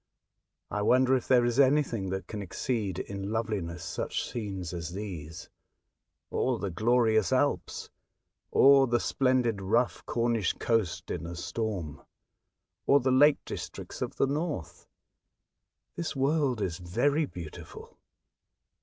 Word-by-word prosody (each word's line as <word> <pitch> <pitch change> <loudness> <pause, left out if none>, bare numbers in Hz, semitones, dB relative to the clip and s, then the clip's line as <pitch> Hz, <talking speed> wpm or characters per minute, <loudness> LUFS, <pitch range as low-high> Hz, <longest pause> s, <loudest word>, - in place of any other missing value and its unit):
'' - - -51
I 105 - -1
wonder 130 +4 +4
if 125 - -2
there 125 -2 +5
is 120 +2 0
anything 130 -8 +3
that 95 +1 -3
can 105 -2 -6
exceed 100 0 -2
in 100 0 -5
loveliness 100 -7 -2
such - - -3
scenes 95 -7 -5
as 85 -1 -5
these, 90 -6 -7 0.8
or 125 -2 0
the 100 -3 -3
glorious 110 0 +2
Alps, - - 0 0.6
or 135 -1 +6
the 120 0 +2
splendid 125 -6 +1
rough 115 +6 +1
Cornish 115 -4 +1
coast 115 -8 -1
in 85 - -4
a 85 - -6
storm, 90 -4 -4 0.9
or 140 - +6
the 130 0 +1
lake 145 +3 +5
districts - - -7
of - - -3
the - - +2
north. 145 - -4 1.1
This 170 -3 -4
world 135 -3 +1
is 85 -2 -2
very 140 - +1
beautiful." 85 - -10
115 Hz, 130 wpm, -29 LUFS, 95-130 Hz, 1.1 s, or